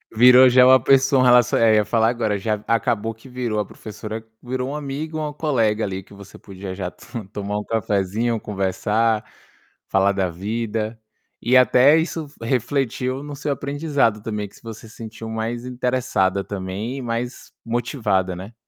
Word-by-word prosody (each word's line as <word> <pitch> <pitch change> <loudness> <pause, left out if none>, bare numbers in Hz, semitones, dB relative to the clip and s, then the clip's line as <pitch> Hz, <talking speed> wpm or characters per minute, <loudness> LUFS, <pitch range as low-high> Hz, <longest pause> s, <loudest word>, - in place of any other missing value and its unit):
Virou 125 +2 +8
já 125 0 +6
uma 130 +1 +7
pessoa, 135 -1 +4
um - - +4
relaci 125 -1 +5
aí 110 -2 +4
eu 105 - +2
falar 115 -1 +2
agora 110 -4 -1
já 105 0 -2
acabou 115 -1 0
que 115 +4 -16
virou 120 -4 -2
a 105 - -1
professora 110 +1 -8 0.2
virou 130 +1 -3
um - - -4
amigo 150 +2 -4
ou 155 -1 -2
um - - -9
colega 115 -8 0
ali 95 -1 -3
que 100 - -18
você 100 0 -13
podia 95 -1 -8
já 95 -1 -4
to 115 -1 -9
tomar 105 0 -3
um - - -5
cafezinho, 110 +2 -1
conversar, 105 +3 0 0.6
falar 95 +1 +3
da 95 -2 0
vida. 110 +4 -3 0.4
E 130 +2 +4
até 130 +4 +6
isso 160 -1 -2
re 115 - -4
refletiu 130 0 -1
no 145 -1 -7
seu 150 +1 -3
aprendizado 140 -6 0
também 105 -3 -3
que - - -20
se - - -19
você 115 0 -9
sentiu 110 0 -9
mais 115 +2 -3
interessada 125 -6 0
também 100 +6 -5
e - - -5
mais 120 +1 -4
motivada, 115 -6 -1
né. 95 +6 -9
115 Hz, 175 wpm, -22 LUFS, 105-125 Hz, 0.6 s, Virou